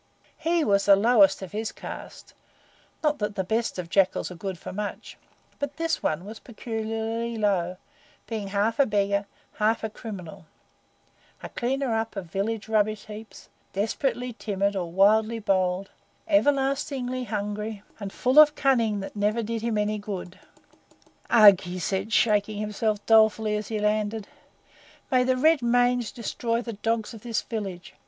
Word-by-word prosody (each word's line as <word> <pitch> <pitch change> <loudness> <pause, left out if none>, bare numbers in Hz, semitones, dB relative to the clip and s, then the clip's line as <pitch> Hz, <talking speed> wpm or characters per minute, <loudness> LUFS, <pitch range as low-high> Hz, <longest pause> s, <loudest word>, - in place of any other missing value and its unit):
He 330 +1 +1
was 200 -5 +2
the 200 - +9
lowest 200 -2 +4
of 185 - -8
his 215 +1 -3
caste - - -9 0.7
not 300 -1 +1
that 210 -1 -2
the 190 - -1
best 225 +4 -1
of 180 -2 -4
jackals 185 +1 +1
are - - -8
good 190 +1 -5
for - - -8
much, 205 +1 -5 0.4
but 285 0 -4
this 330 0 -1
one 160 +4 -1
was 215 +2 -8
peculiarly 225 0 -4
low, 185 -4 0 0.5
being 215 -3 -4
half 205 +4 0
a 280 - +5
beggar, 200 -1 0 0.3
half 220 +1 +1
a 220 - -3
criminal 195 -6 -9 1.0
a - - -6
cleaner 260 0 -1
up 225 0 -2
of 195 -3 -4
village 215 +3 -2
rubbish 215 -1 +1
heaps, 215 0 -11 0.2
desperately 245 +4 -1
timid 200 -2 -1
or 175 -3 -3
wildly 215 +5 +4
bold, 190 -2 0 0.4
everlastingly 275 -4 +1
hungry, 210 -1 -4 0.2
and 200 -2 -5
full 255 +8 +3
of 305 0 +7
cunning 230 -8 +2
that 195 - -8
never 210 +3 0
did 225 +1 -3
him 230 -1 -1
any 210 0 0
good. 190 -3 -7 0.9
"Ugh!" 205 -5 +8
he 180 0 -6
said, 195 +4 -2
shaking 210 -2 +2
himself 210 0 -2
dolefully 220 -1 +4
as 210 -1 -3
he 220 - -3
landed. 210 0 -1 0.8
"May 255 -1 +4
the 255 0 +2
red 315 +2 +4
mange 245 0 +2
destroy 235 0 -2
the 230 - -5
dogs 225 +2 -2
of 225 - -10
this 230 -1 -2
village! 195 -6 -6
215 Hz, 155 wpm, -26 LUFS, 200-235 Hz, 1.0 s, the